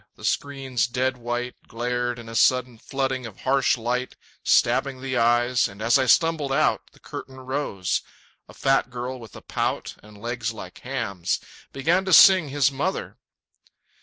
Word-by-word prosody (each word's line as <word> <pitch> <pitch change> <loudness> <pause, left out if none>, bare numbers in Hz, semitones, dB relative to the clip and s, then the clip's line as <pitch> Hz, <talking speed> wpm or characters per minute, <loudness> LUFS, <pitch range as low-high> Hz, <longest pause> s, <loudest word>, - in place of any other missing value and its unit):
The - - -10
screen's 135 -4 -1
dead 130 +1 -1
white 120 +1 -3
Glared 120 +1 -2
in 120 -1 -10
a 115 - -8
sudden 125 0 +2
flooding 130 -2 -2
of 105 - -13
harsh 135 -1 +2
light 125 +2 -2 0.3
Stabbing 135 -2 +2
the 130 0 -3
eyes; 120 +1 +3
and 100 +1 -13
as 115 +5 +3
I 130 - +1
stumbled 160 -1 +3
out 155 +3 +2
The - - -21
curtain 130 - -9
rose. 130 -8 -2 0.5
A - - -12
fat 135 -2 +2
girl 125 +1 -5
with 115 -3 -12
a - - -10
pout - - -2
And 105 0 -15
legs 120 +1 -3
like 90 -4 -10
hams, 115 -9 -2 0.3
began 165 +8 +1
to 190 - +1
sing 185 -3 +8
"His 140 0 +2
Mother". 145 +8 -3
125 Hz, 165 wpm, -24 LUFS, 120-135 Hz, 0.5 s, sing